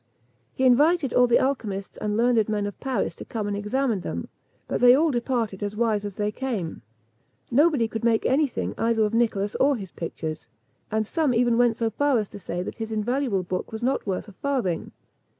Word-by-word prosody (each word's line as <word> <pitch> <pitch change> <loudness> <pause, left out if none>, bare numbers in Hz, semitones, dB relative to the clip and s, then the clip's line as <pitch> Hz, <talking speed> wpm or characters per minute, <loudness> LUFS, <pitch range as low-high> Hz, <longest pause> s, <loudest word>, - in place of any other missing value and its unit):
He 260 - +1
invited 290 +3 +4
all 250 0 +5
the 240 - +5
alchymists 215 -8 -2
and 210 0 -2
learned 230 -2 +3
men 210 -1 0
of 205 - -6
Paris 250 -10 -2
to - - -7
come 215 -3 -4
and 205 - -2
examine 220 +2 0
them, - - -5 0.4
but - - -2
they 245 0 +8
all 315 +3 +3
departed 235 -5 -1
as 205 0 -3
wise 215 -2 +1
as 205 -2 -5
they 210 0 -1
came. 210 -9 -4 0.7
Nobody 285 -2 +4
could 225 0 -5
make 230 -1 +2
any 285 +3 +3
thing 250 - -4
either 225 -1 +2
of 210 - -2
Nicholas 215 -3 +1
or 280 +1 +4
his 195 -7 -7
pictures; 160 -2 -5 0.4
and 220 0 0
some 290 +1 0
even 240 0 +3
went 240 -1 +3
so 225 -1 0
far 285 +3 +2
as 210 -3 -2
to - - -10
say 175 -1 -4
that - - -7
his 225 -1 -5
invaluable 220 -2 0
book 180 +1 -4
was 220 +1 -6
not 260 -3 0
worth 190 +2 -2
a - - -11
farthing. 235 -6 -2
225 Hz, 205 wpm, -25 LUFS, 205-255 Hz, 0.7 s, they